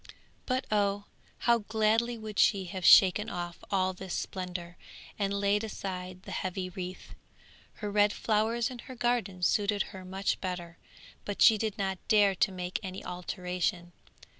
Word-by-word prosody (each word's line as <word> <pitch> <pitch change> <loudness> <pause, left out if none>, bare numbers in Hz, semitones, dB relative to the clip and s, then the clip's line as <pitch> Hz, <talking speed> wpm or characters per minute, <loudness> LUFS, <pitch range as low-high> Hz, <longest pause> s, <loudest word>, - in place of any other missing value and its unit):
But 255 0 0
oh! 205 -1 +1 0.4
how 235 -1 +5
gladly 220 +2 +1
would 215 -2 -6
she 195 -3 +4
have 185 +1 -6
shaken 195 +3 +7
off 175 -1 -6
all 185 -1 +1
this 185 0 -6
splendour, 180 -2 -5 0.4
and 200 -1 0
laid 200 +1 +1
aside 185 -3 -6
the - - -9
heavy 185 0 -3
wreath. 185 0 -7 0.6
Her 210 -2 -5
red 205 0 +4
flowers 225 +3 0
in 250 - -8
her 255 - -9
garden 235 -7 -1
suited 205 +2 +2
her 190 -1 -8
much 190 +2 -2
better, 175 -2 -5 0.4
but 205 - -5
she 225 - +8
did 220 0 -2
not 190 -2 -2
dare 205 -3 +5
to 190 - +1
make 180 -1 -3
any 190 0 -7
alteration. 180 -1 -3
195 Hz, 155 wpm, -30 LUFS, 185-215 Hz, 0.6 s, she